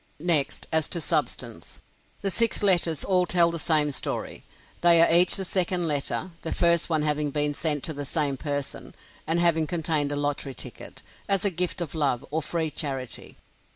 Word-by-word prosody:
Next, 155 Hz, -3 st, +3 dB
as 160 Hz, -1 st, +3 dB
to 170 Hz, -, -2 dB
substance. -, -, -3 dB, 0.4 s
The 195 Hz, -, -1 dB
six 225 Hz, +4 st, +1 dB
letters 175 Hz, -6 st, +3 dB
all 180 Hz, -2 st, +2 dB
tell 170 Hz, -1 st, +4 dB
the 170 Hz, -, -5 dB
same 150 Hz, -2 st, +3 dB
story. 135 Hz, -, -4 dB, 0.4 s
They 170 Hz, -1 st, +5 dB
are 165 Hz, 0 st, +5 dB
each 175 Hz, +1 st, +5 dB
the 195 Hz, -, -3 dB
second 180 Hz, -1 st, 0 dB
letter; 150 Hz, +5 st, 0 dB
the 165 Hz, -, -5 dB
first 170 Hz, -1 st, +2 dB
one 155 Hz, -2 st, 0 dB
having 150 Hz, -1 st, -1 dB
been 145 Hz, +1 st, -1 dB
sent 150 Hz, -2 st, -1 dB
to 160 Hz, -, -2 dB
the 145 Hz, 0 st, -6 dB
same 145 Hz, -1 st, 0 dB
person, 145 Hz, 0 st, -5 dB, 0.3 s
and 165 Hz, +2 st, +1 dB
having 165 Hz, -2 st, +2 dB
contained 155 Hz, -4 st, -1 dB
a -, -, -2 dB
lottery 145 Hz, -2 st, -3 dB
ticket, -, -, -9 dB, 0.3 s
as 195 Hz, 0 st, +1 dB
a 200 Hz, -, +2 dB
gift 180 Hz, 0 st, -1 dB
of 165 Hz, -, -5 dB
love 140 Hz, -6 st, -1 dB
or 160 Hz, +2 st, -1 dB
free 160 Hz, 0 st, -3 dB
charity. 135 Hz, -6 st, -5 dB
160 Hz, 185 wpm, -25 LUFS, 145-175 Hz, 0.4 s, They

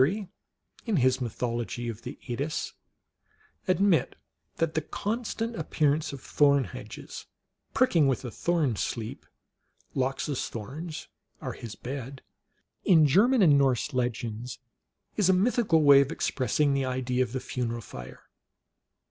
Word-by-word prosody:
Keary, 190 Hz, +8 st, +1 dB, 0.6 s
in 220 Hz, -, +1 dB
his 130 Hz, -3 st, +3 dB
Mythology 120 Hz, -1 st, -3 dB
of 115 Hz, -1 st, -5 dB
the -, -, -7 dB
Eddas, 140 Hz, +6 st, -3 dB, 0.4 s
" 430 Hz, -, -36 dB
admit 195 Hz, -3 st, +2 dB, 0.4 s
that 165 Hz, -1 st, 0 dB
the 155 Hz, -, 0 dB
constant 225 Hz, +6 st, -3 dB
appearance 155 Hz, -3 st, 0 dB
of 140 Hz, -, -7 dB
thorn 140 Hz, -2 st, +4 dB
hedges, -, -, -9 dB, 0.5 s
pricking 175 Hz, -, +4 dB
with 130 Hz, -1 st, 0 dB
a 120 Hz, -, -5 dB
sleep 120 Hz, -, -1 dB
thorn -, -, -34 dB, 0.6 s
(Lox 135 Hz, 0 st, -1 dB
s 145 Hz, -4 st, -2 dB
thorns 150 Hz, +9 st, -6 dB, 0.3 s
are -, -, -4 dB
his 115 Hz, -3 st, -8 dB
bed), 135 Hz, +1 st, -7 dB, 0.6 s
in 160 Hz, -4 st, +6 dB
German 215 Hz, -, +5 dB
and 145 Hz, -5 st, +6 dB
Norse 135 Hz, +1 st, +1 dB
legends, 120 Hz, -1 st, -2 dB, 0.6 s
is 200 Hz, -4 st, +3 dB
a -, -, +6 dB
mythical 195 Hz, -4 st, +3 dB
way 140 Hz, -1 st, +8 dB
of 140 Hz, +2 st, -1 dB
expressing 140 Hz, -1 st, +1 dB
the 135 Hz, -1 st, +1 dB
idea 130 Hz, -1 st, -1 dB
of 125 Hz, -, 0 dB
the 130 Hz, -, -2 dB
funeral 120 Hz, -2 st, -3 dB
fire." 65 Hz, -, -10 dB
140 Hz, 140 wpm, -28 LUFS, 125-165 Hz, 0.6 s, way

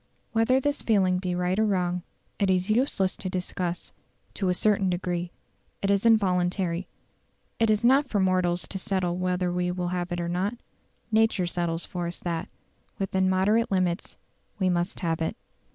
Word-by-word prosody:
Whether 230 Hz, +3 st, +3 dB
this 290 Hz, +2 st, -1 dB
feeling 190 Hz, -5 st, +2 dB
be 180 Hz, -1 st, -2 dB
right 180 Hz, +2 st, 0 dB
or 220 Hz, -, +4 dB
wrong, 180 Hz, -3 st, 0 dB, 0.4 s
it 200 Hz, -2 st, +2 dB
is 185 Hz, +2 st, +2 dB
useless 215 Hz, -5 st, +1 dB
to 185 Hz, -, -4 dB
discuss; 180 Hz, -1 st, -3 dB, 0.4 s
to 190 Hz, -3 st, -1 dB
a -, -, +3 dB
certain 200 Hz, -1 st, +2 dB
degree, 175 Hz, -1 st, -2 dB, 0.5 s
it 200 Hz, -, +2 dB
is 200 Hz, +3 st, +3 dB
involuntary; 180 Hz, -4 st, +2 dB, 0.7 s
it 225 Hz, -1 st, +3 dB
is 215 Hz, +2 st, +2 dB
not 270 Hz, +2 st, +4 dB
for 205 Hz, -, +1 dB
mortals 185 Hz, -2 st, +1 dB
to 195 Hz, -, -4 dB
settle 185 Hz, -3 st, -1 dB
whether 180 Hz, 0 st, 0 dB
we 180 Hz, 0 st, 0 dB
will 180 Hz, 0 st, -2 dB
have 180 Hz, 0 st, -3 dB
it 175 Hz, -, -2 dB
or 170 Hz, -, -2 dB
not; 185 Hz, +6 st, -1 dB, 0.6 s
nature 220 Hz, -4 st, +3 dB
settles 175 Hz, -1 st, -1 dB
for 175 Hz, -1 st, -4 dB
us 170 Hz, -, -5 dB
that, 170 Hz, -2 st, -3 dB, 0.5 s
within 190 Hz, -1 st, +1 dB
moderate 205 Hz, +5 st, +2 dB
limits, 185 Hz, -2 st, -1 dB, 0.4 s
we 190 Hz, -3 st, +2 dB
must 175 Hz, +1 st, -1 dB
have 165 Hz, -2 st, -1 dB
it. 165 Hz, +8 st, -2 dB
185 Hz, 170 wpm, -27 LUFS, 175-200 Hz, 0.7 s, or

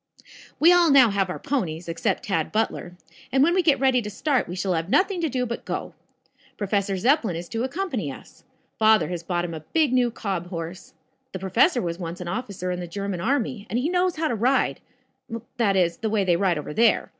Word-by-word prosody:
"We 340 Hz, +3 st, +7 dB
all 350 Hz, -2 st, +5 dB
now 265 Hz, -6 st, +6 dB
have 195 Hz, -2 st, 0 dB
our 180 Hz, -, -4 dB
ponies, 180 Hz, -, -3 dB
except 170 Hz, +4 st, -1 dB
Tad 165 Hz, -6 st, -1 dB
Butler, 215 Hz, -5 st, -2 dB, 0.3 s
and 265 Hz, +1 st, +4 dB
when 340 Hz, +4 st, +3 dB
we 370 Hz, -, +3 dB
get 310 Hz, -5 st, +3 dB
ready 260 Hz, -2 st, +3 dB
to 210 Hz, -, -5 dB
start 260 Hz, +6 st, 0 dB
we 175 Hz, -, -6 dB
shall 190 Hz, 0 st, -1 dB
have 165 Hz, +1 st, -2 dB
nothing 375 Hz, -, +2 dB
to 325 Hz, -, 0 dB
do 250 Hz, -1 st, -1 dB
but 235 Hz, 0 st, -5 dB
go. -, -, -4 dB, 0.6 s
Professor 200 Hz, -1 st, -1 dB
Zepplin 230 Hz, -, +2 dB
is 170 Hz, +1 st, -6 dB
to 230 Hz, +1 st, -2 dB
accompany 260 Hz, -, -3 dB
us. -, -, -14 dB, 0.4 s
Father 220 Hz, -2 st, +4 dB
has 175 Hz, -2 st, -4 dB
bought 175 Hz, 0 st, -2 dB
him 170 Hz, -, -5 dB
a 160 Hz, -, -5 dB
big 290 Hz, -, 0 dB
new 250 Hz, -1 st, +3 dB
cob 195 Hz, -6 st, -4 dB
horse. 170 Hz, -1 st, -7 dB, 0.4 s
The -, -, -3 dB
professor 235 Hz, -, +2 dB
was 170 Hz, 0 st, -3 dB
once 170 Hz, +1 st, -5 dB
an 180 Hz, -, -6 dB
officer 185 Hz, -2 st, -4 dB
in 180 Hz, -, -3 dB
the 175 Hz, -, -5 dB
German 195 Hz, 0 st, -4 dB
army, 230 Hz, -2 st, -1 dB
and 230 Hz, -, -1 dB
he 265 Hz, +6 st, 0 dB
knows 360 Hz, 0 st, +1 dB
how 315 Hz, 0 st, 0 dB
to -, -, -1 dB
ride 245 Hz, +5 st, +1 dB, 0.8 s
that 210 Hz, -5 st, +2 dB
is, 170 Hz, -3 st, +2 dB
the 220 Hz, -, -2 dB
way 210 Hz, -2 st, +1 dB
they 180 Hz, -2 st, +2 dB
ride 180 Hz, -2 st, +1 dB
over 150 Hz, 0 st, -5 dB
there. 230 Hz, +5 st, +3 dB
210 Hz, 220 wpm, -24 LUFS, 175-260 Hz, 0.8 s, We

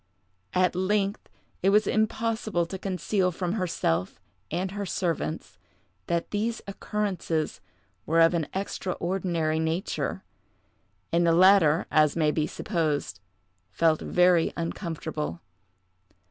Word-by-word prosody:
At 180 Hz, 0 st, +3 dB
length 195 Hz, +2 st, 0 dB, 0.3 s
it 190 Hz, -, +3 dB
was 210 Hz, +1 st, +4 dB
impossible 220 Hz, -4 st, 0 dB
to 190 Hz, +3 st, -7 dB
conceal 185 Hz, 0 st, 0 dB
from 180 Hz, +1 st, -2 dB
herself 130 Hz, -, -1 dB, 0.3 s
and 185 Hz, +1 st, -2 dB
her 205 Hz, +1 st, -4 dB
servants 170 Hz, -, -3 dB, 0.5 s
that 170 Hz, -1 st, -1 dB
these 225 Hz, +3 st, -1 dB
occurrences 195 Hz, -6 st, -2 dB, 0.5 s
were 165 Hz, +2 st, +3 dB
of 165 Hz, +1 st, +6 dB
an 165 Hz, -3 st, 0 dB
extraordinary 175 Hz, -4 st, -2 dB
nature, 160 Hz, +3 st, -2 dB, 0.9 s
and 170 Hz, 0 st, +3 dB
the 165 Hz, -, +5 dB
latter, 175 Hz, -3 st, +5 dB
as 155 Hz, -2 st, +4 dB
may 155 Hz, -2 st, +2 dB
be 155 Hz, 0 st, 0 dB
supposed, 160 Hz, -8 st, -2 dB, 0.5 s
felt 160 Hz, +3 st, +2 dB
very 180 Hz, -2 st, +3 dB
uncomfortable. 160 Hz, -, -4 dB
175 Hz, 110 wpm, -27 LUFS, 160-195 Hz, 0.9 s, of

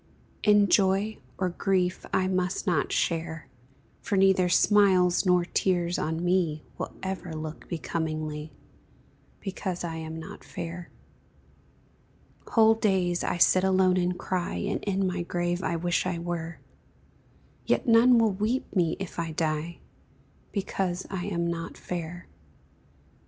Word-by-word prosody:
In 205 Hz, -1 st, +5 dB
joy 195 Hz, +3 st, +2 dB, 0.2 s
or 185 Hz, -, 0 dB
grief 180 Hz, 0 st, 0 dB
I 185 Hz, -, +2 dB
must 185 Hz, +1 st, -1 dB
not 175 Hz, -7 st, +1 dB
share, 165 Hz, -1 st, -1 dB, 0.5 s
For 205 Hz, -, -2 dB
neither 190 Hz, -1 st, +4 dB
smiles 185 Hz, -2 st, +4 dB
nor 180 Hz, -1 st, +4 dB
tears 175 Hz, -1 st, 0 dB
on 160 Hz, +2 st, -2 dB
me 175 Hz, -4 st, +1 dB, 0.2 s
Will -, -, -3 dB
ever 185 Hz, -3 st, -4 dB
look 155 Hz, 0 st, -7 dB
becomingly, 155 Hz, -2 st, -3 dB, 0.9 s
Because 185 Hz, -2 st, -4 dB
I 165 Hz, -1 st, -4 dB
am 160 Hz, 0 st, -6 dB
not 160 Hz, -, -10 dB
fair; 170 Hz, +1 st, -7 dB, 1.6 s
Whole 225 Hz, -1 st, +5 dB
days 190 Hz, -5 st, +1 dB
I -, -, -1 dB
sit 185 Hz, +2 st, +5 dB
alone 185 Hz, -1 st, +3 dB
and 180 Hz, 0 st, 0 dB
cry, 180 Hz, -2 st, -2 dB
And 205 Hz, 0 st, -2 dB
in 195 Hz, -1 st, 0 dB
my 185 Hz, -1 st, -1 dB
grave 175 Hz, +1 st, -2 dB
I 170 Hz, -, -1 dB
wish 175 Hz, +2 st, 0 dB
I 180 Hz, -2 st, -1 dB
were 170 Hz, -1 st, -4 dB, 1.1 s
Yet -, -, +1 dB
none 235 Hz, +2 st, +6 dB
will 225 Hz, -2 st, +4 dB
weep 220 Hz, +7 st, -2 dB
me 170 Hz, -4 st, +2 dB
if 195 Hz, -3 st, -6 dB
I 165 Hz, -1 st, -3 dB
die, 160 Hz, +1 st, -2 dB, 0.7 s
Because 190 Hz, -2 st, -2 dB
I 185 Hz, -2 st, -3 dB
am 170 Hz, -4 st, -1 dB
not 170 Hz, -1 st, -4 dB
fair. 175 Hz, 0 st, -6 dB
180 Hz, 135 wpm, -27 LUFS, 170-190 Hz, 1.6 s, none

